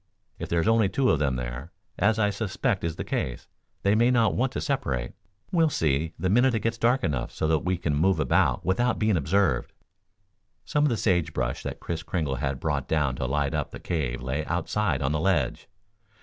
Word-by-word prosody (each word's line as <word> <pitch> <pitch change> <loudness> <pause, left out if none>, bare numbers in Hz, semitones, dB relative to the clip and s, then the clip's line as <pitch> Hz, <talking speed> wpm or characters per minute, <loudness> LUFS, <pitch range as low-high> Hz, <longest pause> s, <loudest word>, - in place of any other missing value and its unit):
If - - -5
there's 85 +1 +1
only 115 -3 +4
two 130 +4 +2
of 80 - +1
them 70 -4 +1
there, 60 +6 -5 0.3
as 110 +2 +3
I 105 -2 +2
suspect 105 -1 -1
is 85 -1 -2
the - - -4
case, 65 -1 -3 0.4
they 100 - +3
may 115 +3 +4
not 115 -3 +3
want 130 +2 0
to - - -2
separate. 65 - -2 0.4
We'll 165 -4 +3
see, 80 - 0
the 95 - -1
minute 120 +5 +3
it 110 - -1
gets 115 0 -1
dark 125 +3 +2
enough 70 -6 -1
so 80 - -2
that 80 -1 +3
we 95 0 -1
can 80 -3 -1
move 90 +3 +2
about 70 +1 +2
without 115 +7 +1
being 110 -2 +2
observed." 80 -3 +1 0.9
Some 150 0 +1
of - - +3
the 120 - 0
sage 90 -7 +1
brush - - -2
that - - -6
Kris 85 -1 -4
Kringle 80 -6 -2
had 65 +1 -2
brought 75 -4 -2
down 75 -5 +1
to 65 - -2
light 70 0 0
up - - -1
the - - -9
cave 65 -8 -2
lay 70 +4 -2
outside 90 -3 -1
on 65 - +1
the 80 - 0
ledge. 80 -4 0
85 Hz, 210 wpm, -26 LUFS, 70-110 Hz, 0.9 s, only